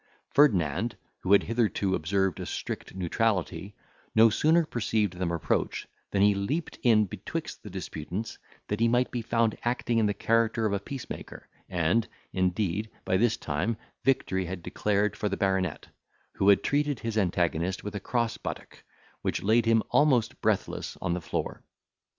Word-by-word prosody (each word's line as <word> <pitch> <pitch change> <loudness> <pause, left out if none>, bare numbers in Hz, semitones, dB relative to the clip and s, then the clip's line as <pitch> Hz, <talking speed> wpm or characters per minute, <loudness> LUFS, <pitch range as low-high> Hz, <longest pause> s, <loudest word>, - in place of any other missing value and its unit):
Ferdinand, 95 - +3 0.2
who 95 - -3
had 100 - +6
hitherto 110 -4 0
observed 95 +1 0
a - - -4
strict - - -5
neutrality, 95 0 -1 0.4
no 110 0 +7
sooner 160 +8 +3
perceived 110 - 0
them 90 -1 -2
approach, 85 -2 -1 0.2
than 100 0 +2
he 105 0 +6
leaped 130 +12 -3
in 110 -4 +5
between 105 - -4 0.2
the 105 - -9
disputants, 90 +2 -5 0.3
that 105 - -2
he 115 - +4
might 120 +2 +2
be 120 - -2
found 115 -1 +1
acting 120 -1 0
in 110 - +3
the 105 - +1
character 115 0 +2
of 105 - +1
a 100 - +1
peacemaker; 130 +5 -8 0.2
and, 90 +6 +1 0.3
indeed, 95 +3 0 0.2
by 95 - +1
this 110 +3 +3
time, 90 +10 -1 0.3
victory 95 -8 +1
had 90 0 -6
declared 105 +2 0
for 105 - -1
the 100 - -2
baronet, 95 -4 0 0.5
who 100 - +3
had 100 - +5
treated 145 -3 0
his 115 -1 -3
antagonist 90 -2 0
with 105 - -5
a 100 - -3
cross 115 +3 -1
buttock, - - -7 0.4
which - - -2
laid 115 +3 +3
him 115 -1 +4
almost 135 -6 +3
breathless - - -1
on 90 -2 -1
the 90 - -2
floor. - - -4
105 Hz, 160 wpm, -28 LUFS, 95-115 Hz, 0.5 s, no